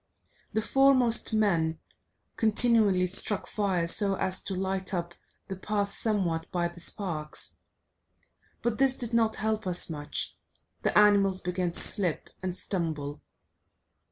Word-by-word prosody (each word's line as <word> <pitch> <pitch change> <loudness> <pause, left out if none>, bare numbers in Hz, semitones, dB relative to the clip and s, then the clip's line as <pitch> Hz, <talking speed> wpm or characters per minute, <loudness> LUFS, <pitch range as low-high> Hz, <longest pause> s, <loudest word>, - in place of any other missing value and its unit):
The 220 - 0
foremost 260 -3 +3
man 170 -7 +1 0.6
continually 220 -4 +3
struck 190 +2 0
fire, 190 -5 -1
so 195 +3 +2
as 185 0 0
to 195 - -3
light 190 +1 -3
up 170 0 -4 0.3
the 195 - -5
path 200 +1 -2
somewhat 185 -7 0
by 175 -2 -1
the 175 0 -13
sparks. 165 -5 -2 1.1
But 235 0 -1
this 270 -1 +3
did 240 -2 -6
not 225 -1 +2
help 220 -2 -2
us 175 -1 +2
much, 150 -1 -4 0.5
the - - 0
animals 200 -2 +4
began 180 -1 -2
to - - +5
slip 180 -6 +2
and 185 -1 -4
stumble. 155 -6 -3
195 Hz, 130 wpm, -28 LUFS, 175-215 Hz, 1.1 s, to